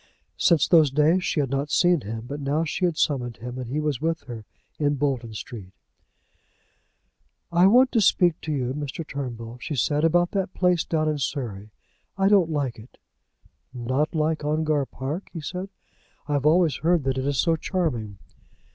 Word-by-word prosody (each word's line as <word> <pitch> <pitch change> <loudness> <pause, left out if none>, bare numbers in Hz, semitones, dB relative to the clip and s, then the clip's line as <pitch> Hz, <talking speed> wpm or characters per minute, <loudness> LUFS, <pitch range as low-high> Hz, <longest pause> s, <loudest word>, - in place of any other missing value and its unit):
Since 165 -5 +3
those 160 -4 +5
days 155 +6 +3
she 150 - 0
had 135 -2 -3
not 140 +2 -1
seen 175 0 +3
him, 110 +1 -6
but 140 +4 -6
now 145 +3 0
she 165 +3 -1
had 170 -3 -1
summoned 120 -5 0
him, 125 +2 -7
and 125 -2 -6
he 145 +4 -1
was 150 -4 -2
with 165 +1 -1
her 115 -4 -9 0.3
in 145 -1 +1
Bolton 130 -6 -2
Street. 100 -4 -8 1.8
"I 175 +2 +5
want 255 +5 +5
to 230 - +2
speak 175 -4 +3
to 155 - -4
you, 130 -3 -1
Mr. 145 +2 -5
Turnbull," 120 -4 -6
she 155 - -4
said, 145 +4 +1
"about 175 +2 +3
that 190 -2 -2
place 180 -3 +2
down 155 -1 0
in 150 -1 -1
Surrey. 115 -7 -4 0.5
I 195 0 +3
don't 195 -5 +4
like 140 -7 -2
it." 110 - -15 0.8
"Not 130 +7 -1
like 155 0 0
Ongar 150 -2 0
Park?" 145 +9 -5
he 170 - -5
said. 180 +6 -5 0.6
"I 145 - -1
have 145 0 +1
always 160 -4 +3
heard 165 +1 +2
that 130 0 -1
it 130 - -2
is 140 -1 0
so 165 +3 +3
charming." 140 - -2
150 Hz, 180 wpm, -24 LUFS, 130-165 Hz, 1.8 s, those